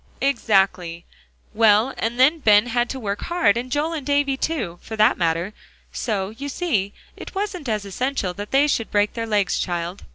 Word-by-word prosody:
"Exactly; 195 -9 +1 0.5
well, 220 +3 +4
and 235 +2 -3
then 295 +6 +5
Ben 210 -5 +5
had 240 0 0
to 265 - -4
work 205 -3 -3
hard, 340 - +2
and 250 +2 -4
Joel 300 +4 0
and 310 -4 -4
Davie 285 0 +1
too, 235 - -3
for 220 - -7
that 215 0 +4
matter. 170 +3 -1 0.4
So, 200 -4 -2
you 280 +6 -7
see, 235 - -1 0.2
it - - -10
wasn't 385 - -3
as 210 -2 -1
essential 200 -1 -2
that 205 +2 -7
they 275 +2 +4
should 225 -6 -1
break 205 0 +1
their 230 -1 -4
legs, 205 -3 +1
child." 175 +2 -3
225 Hz, 185 wpm, -22 LUFS, 200-275 Hz, 0.5 s, then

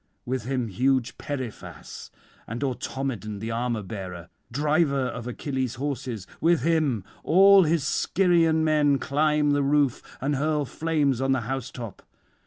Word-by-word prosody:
With 125 -2 -3
him 130 -2 -1
huge 125 +4 0
Periphas, 130 -7 -7 0.4
and 115 +5 -4
Automedon 130 -4 -3
the 110 +2 -4
armour 115 -1 -1
bearer, 95 -4 -7 0.2
driver 145 0 +1
of 125 -1 -6
Achilles' 130 0 -3
horses, 130 -6 -4
with 165 -4 +3
him 155 - +1 0.2
all 195 +2 +7
his 160 -1 +1
Scyrian 165 0 +2
men 150 -3 +3
climb 150 +1 +1
the 145 0 +2
roof 140 -2 +2 0.2
and 140 +1 -1
hurl 150 0 0
flames 145 -2 0
on 135 0 +2
the 130 - 0
housetop. 125 -3 -5
135 Hz, 135 wpm, -26 LUFS, 120-150 Hz, 0.4 s, all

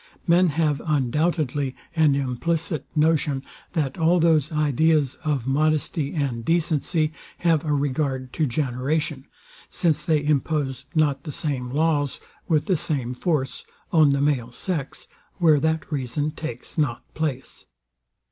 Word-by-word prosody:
Men 175 +2 +5
have 150 -3 +1
undoubtedly 145 -1 0 0.2
an 155 -4 +4
implicit 150 +4 -1
notion, 150 -3 +2 0.3
that 150 -2 -1
all 170 +2 +4
those 160 -3 +3
ideas 150 -1 +2
of 145 -6 -1
modesty 150 +2 0
and 135 -6 -1
decency 160 +1 +1 0.2
have 165 -3 +2
a 155 - -1
regard 135 -2 -1
to 155 - +1
generation; 140 +3 -1 0.4
since 160 -4 +1
they 155 -3 +1
impose 145 -2 0
not 145 -3 +2
the 150 - -6
same 135 -4 -3
laws, 145 0 +1 0.3
with 155 -4 +2
the 185 -4 +2
same 130 -5 -2
force, 135 -1 -1 0.3
on 155 -3 +6
the 140 0 +2
male 135 -5 +1
sex, 150 0 -4 0.3
where 160 -5 +5
that 160 +2 -1
reason 145 +2 -1
takes 155 0 -6
not 130 -6 0
place. 145 -5 -4
150 Hz, 130 wpm, -24 LUFS, 135-160 Hz, 0.4 s, on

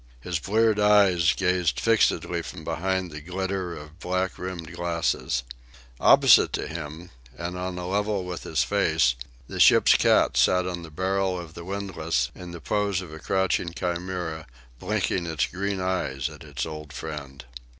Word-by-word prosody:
His 85 +5 -3
bleared 110 +4 +2
eyes 100 -5 +5
gazed 90 -2 +1
fixedly 115 -1 +2
from - - -9
behind 95 +1 -2
the 75 0 -7
glitter 90 +1 -3
of 75 +3 -12
black 90 +1 -2
rimmed 90 -3 -6
glasses. 85 -7 -1 0.6
Opposite - - +6
to - - -2
him, 80 +1 -7 0.3
and 85 +1 -4
on 90 0 -4
a 90 0 -4
level 100 0 0
with 90 -1 -5
his 80 - 0
face, - - +2 0.3
the - - -6
ship's - - +7
cat - - +3
sat 90 0 +4
on 90 -1 -4
the 85 - -9
barrel 95 +2 -1
of 85 -2 -9
the 85 - -9
windlass 85 -9 -2
in 90 -1 -9
the 85 0 -8
pose 100 +1 0
of 85 -4 -10
a 80 - -8
crouching 95 -2 0
chimera, 90 -3 -3 0.3
blinking 85 -2 -1
its 80 -4 0
green 100 +1 -3
eyes 90 -8 -1
at - - -12
its 70 -5 -4
old 75 -2 -8
friend. 70 -3 -7
90 Hz, 160 wpm, -26 LUFS, 80-95 Hz, 0.6 s, ship's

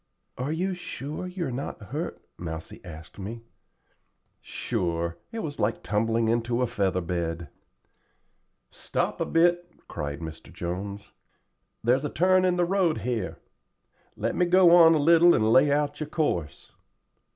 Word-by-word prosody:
"Are 130 +4 -3
you 185 +4 -1
sure 155 -1 -6
you 180 -1 -4
are - - -3
not 130 +3 -5
hurt?" - - -6
Mousie 80 -2 -7
asked 80 0 -11
me. 115 +4 -6 1.0
"Sure; 85 -1 -3
it 225 -1 -4
was 145 -2 -6
like 105 +2 0
tumbling 115 +2 +1
into 120 +2 +1
a - - +3
feather 100 -6 0
bed." 85 -2 -3 1.2
"Stop - - -3
a - - 0
bit," 175 +1 +2 0.2
cried 70 -1 -5
Mr. 80 -1 -9
Jones. 100 +4 -5 0.7
"There's 125 +4 +2
a 150 - -1
turn 185 +2 +3
in 180 -1 +2
the 175 0 +2
road 180 -3 +1
here. 115 -5 -3 0.8
Let 115 +3 -2
me 180 - +2
go 180 -1 +6
on 165 -2 +7
a - - +3
little 170 +3 +6
and 110 +1 +2
lay 140 +2 +5
out 145 0 0
your 155 -1 -4
course." 90 - -2
120 Hz, 150 wpm, -26 LUFS, -, 1.2 s, on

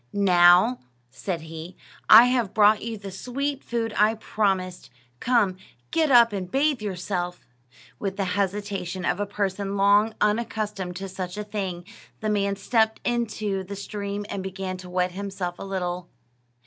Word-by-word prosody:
"Now," 185 +4 +5 0.3
said 165 +7 -4
he, 160 +2 -9 0.3
"I 230 - +11
have 245 -5 0
brought 210 0 +5
you 225 -1 -4
the 200 -1 -8
sweet 275 +8 -3
food 230 -2 -2
I 215 +2 +3
promised. 190 -4 -1 0.3
Come, 225 -7 +2 0.3
get 320 -2 +2
up 235 -4 +6
and 185 -3 -4
bathe 275 +2 +1
yourself." 180 -3 -4 0.5
With 195 -1 -3
the 200 - 0
hesitation 195 -2 -2
of 180 - 0
a 205 - -1
person 200 0 -2
long 205 +2 +4
unaccustomed 210 -4 -1
to 195 +2 -5
such 185 0 -6
a 210 - -3
thing, 190 -4 -4 0.3
the 215 -1 -1
man 200 -1 +1
stepped 220 +2 +1
into 215 -5 -1
the 200 +2 -7
stream 200 0 -5
and 200 - -4
began 190 0 -5
to 180 0 -10
wet 180 0 0
himself 190 -2 -5
a - - -6
little. 180 -2 -4
200 Hz, 155 wpm, -25 LUFS, 185-215 Hz, 0.5 s, I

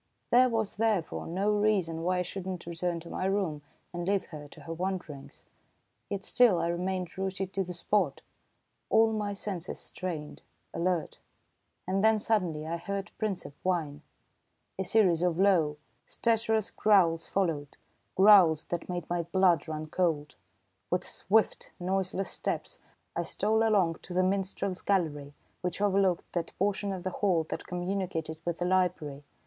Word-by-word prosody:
There 250 +1 +6
was, 220 -3 -1
therefore, 215 -6 0
no 195 +5 0
reason 205 -6 +1
why 180 +2 +1
I - - +1
should 185 +1 -6
not 185 -2 -5
return 170 0 -2
to 170 - -11
my - - -2
room 190 -6 0 0.3
and 175 0 -4
leave 200 -1 +1
her 150 -2 -8
to 150 - -15
her 165 +3 -6
wandering, 175 -5 -4 0.8
yet 200 -1 -3
still 240 -7 +4
I 170 0 0
remained 180 +1 -2
rooted 190 0 -3
to 195 - 0
the 180 - -7
spot, 175 -5 0 0.7
all 225 0 +4
my 210 -1 -1
senses 195 -3 -5
strained, 160 -5 -5 0.3
alert. 175 -1 -1 0.7
And 195 +2 +1
then 220 0 +5
suddenly 180 -8 0
I 165 +2 -2
heard 200 +4 -4
Princep 200 -9 -3
whine. 165 -6 -1 0.8
A - - +1
series 185 -4 +3
of 175 -2 +1
low, 175 -6 +3 0.3
stertorous 225 -2 +1
growls 175 -6 +3
followed, 160 -7 -1 0.4
growls 190 -6 +7
that 175 0 -3
made 175 -2 -3
my 175 0 0
blood 170 -1 +2
run 155 0 -4
cold! 155 -3 0 0.6
With 180 - 0
swift, 220 +2 0
noiseless 190 +1 -1
steps, - - -4 0.3
I - - 0
stole 220 +1 +1
along 200 -7 +3
to 180 - -8
the 185 - +4
minstrel's 190 0 -1
gallery 150 -7 -1 0.3
which 180 0 -2
overlooked 195 -3 +1
that 170 -2 -3
portion 200 +1 0
of 185 -2 -5
the 185 - -2
hall 180 -4 +1
that - - -5
communicated 175 -3 -3
with 170 0 -2
the 175 - -1
library. 180 -6 0
185 Hz, 155 wpm, -29 LUFS, 165-200 Hz, 0.8 s, growls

